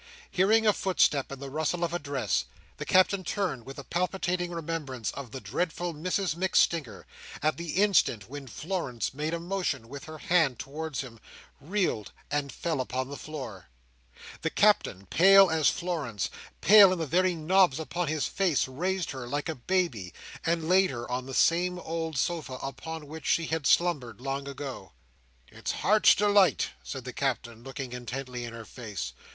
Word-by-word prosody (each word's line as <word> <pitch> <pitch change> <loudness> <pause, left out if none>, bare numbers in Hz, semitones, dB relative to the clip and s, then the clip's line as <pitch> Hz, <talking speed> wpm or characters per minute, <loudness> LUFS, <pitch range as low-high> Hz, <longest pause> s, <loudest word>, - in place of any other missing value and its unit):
Hearing 215 +4 +4
a 210 - +5
footstep 165 -8 +2
and 140 - -6
the 135 0 -7
rustle 160 +4 -1
of 170 0 -1
a 175 - 0
dress, 130 - -1 0.3
the - - -6
Captain 185 +1 +4
turned 165 - -2
with 135 - -8
a 140 - -7
palpitating 180 +1 -1
remembrance 160 -8 -4
of 140 -3 -7
the 130 - -7
dreadful 175 +3 -2
Mrs 180 +2 -1
MacStinger, 165 - +1 0.4
at 155 0 +2
the 170 -2 -5
instant 185 - +3
when 140 +1 -8
Florence 150 -5 -3
made 150 +3 -2
a 170 - -2
motion 170 -9 -2
with 140 +3 -8
her 155 0 -8
hand 155 -6 +2
towards 145 +4 -4
him, 120 -4 -10 0.4
reeled, 160 - -1 0.2
and 145 -1 -1
fell 160 0 -2
upon 130 +1 -3
the 140 - -6
floor. 125 - -7 0.7
The - - 0
Captain, 95 +2 +2
pale 195 - +7
as 160 -2 +4
Florence, 150 - -3 0.3
pale 205 -2 +9
in 185 - 0
the 165 - -2
very 180 +4 +2
knobs 165 -2 +3
upon 170 +2 -2
his 155 0 0
face, 185 -10 +1
raised 180 +7 -2
her 130 -3 -6
like 145 +5 -2
a - - 0
baby, 130 - -1 0.3
and 165 -1 0
laid 185 +1 +5
her 120 -1 -5
on 125 +1 -2
the 135 - -5
same 180 +2 +3
old 165 -3 -4
sofa 160 -2 -1
upon 150 +4 -6
which 155 +1 -8
she 165 - +2
had 160 -2 -1
slumbered 140 - +2
long 135 +2 -3
ago. 135 -7 -7 0.6
"It's - - -4
Heart's 210 +3 +5
Delight!" 205 -6 +3
said 60 - -6
the - - -6
Captain, 115 -1 -2
looking 135 -1 -6
intently 125 0 -5
in 115 - -7
her 115 -1 -8
face. 105 - -6
155 Hz, 170 wpm, -28 LUFS, 130-175 Hz, 0.7 s, pale